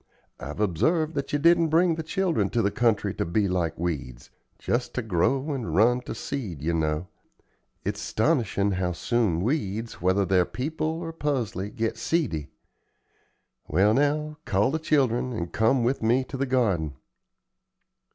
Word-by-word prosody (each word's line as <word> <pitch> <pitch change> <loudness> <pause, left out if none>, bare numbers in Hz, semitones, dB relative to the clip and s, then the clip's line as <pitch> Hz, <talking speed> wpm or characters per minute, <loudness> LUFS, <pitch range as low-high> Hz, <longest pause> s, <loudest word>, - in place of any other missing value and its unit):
I've 75 +8 -7
observed 155 - +1
that 140 -2 -3
you 145 - +2
didn't 170 +2 +4
bring 165 +2 +3
the 160 - -3
children 165 - 0
to 115 - 0
the 100 - +1
country 105 -4 +1
to - - -2
be 100 +5 +1
like 85 -3 -1
weeds 70 -8 -4 0.3
just 125 +1 -2
ter 125 - -1
grow 130 - +1
and 130 -5 -3
run 120 +5 +4
ter - - -6
seed, 100 - -5
ye 85 +2 0
know. 80 +1 -1 0.8
It's - - -2
'stonishin' 110 -6 +1
how 90 -1 0
soon 100 -4 0
weeds, 115 - -2
whether 95 +2 +2
they're 95 -1 +3
people 155 - -3
or 165 +1 -4
pusley, 120 - -2
get 110 +1 -2
seedy. 110 - -1 1.2
Well, 95 +7 +3
now, 150 +3 +1
call 105 +6 +2
the 160 - -1
children 130 -5 +1
and 85 -5 -4
come 115 +3 +3
with 125 +4 0
me 120 +4 +3
to - - -5
the 135 +1 -1
garden." 100 - +1
115 Hz, 160 wpm, -26 LUFS, 95-145 Hz, 1.2 s, didn't